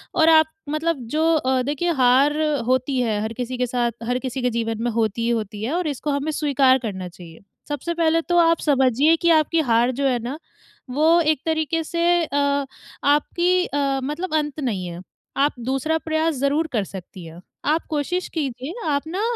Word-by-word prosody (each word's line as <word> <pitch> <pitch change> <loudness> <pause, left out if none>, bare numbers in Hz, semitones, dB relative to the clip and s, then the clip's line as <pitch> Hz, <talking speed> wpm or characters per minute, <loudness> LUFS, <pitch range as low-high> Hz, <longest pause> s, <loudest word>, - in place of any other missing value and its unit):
और 320 -2 +5
आप 315 -1 +7 0.2
मतलब 315 +2 -1
जो 310 - 0
अ, 260 -3 +1
देखिए, 295 +6 -1
हार 270 +1 +3 0.3
होती 260 +1 +1
है, 220 -4 0
हर 220 +1 -3
किसी 250 +1 -4
के 250 - +1
साथ 240 -1 0 0.2
हर 250 +1 0
किसी 260 0 -4
के 250 - +1
जीवन 225 -1 -2
में 240 - +1
होती 225 -1 -1
ही 235 - 0
होती 215 -3 -2
है 255 +8 -2
और 350 -2 -1
इसको 290 +1 -3
हमें 285 +2 -1
स्वीकार 275 -4 +3
करना 195 -6 -5
चाहिए। 170 -2 -13 0.3
सबसे 295 +4 -3
पहले 330 -1 +2
तो 350 +1 0
आप 330 -1 +4
समझिए 275 +2 +3
कि 340 - +3
आपकी 320 +1 +3
हार 235 +2 +3
जो 275 +2 -1
है 250 -2 +1
ना, 265 +5 -4 0.5
वो 315 +6 +4
एक 310 -3 +1
तरीके 320 0 0
से 335 +2 -2 0.2
अ, 285 -1 0 0.5
आपकी 355 +4 +1
अ, 275 -3 -1
मतलब 305 +5 -4
अंत 295 -1 -1
नहीं 210 -10 -2
है। 175 +1 -7 0.4
आप 285 +2 +2
दूसरा 270 +6 -1
प्रयास 315 0 +1
ज़रूर 280 +4 0
कर 215 - +1
सकती 185 -2 -10
हैं। 165 +2 -11 0.2
आप 310 +3 +1
कोशिश 325 +5 -2
कीजिए, 270 0 -3 0.2
आप 285 +1 -1
ना 365 +5 -3
280 Hz, 190 wpm, -22 LUFS, 245-315 Hz, 0.5 s, आप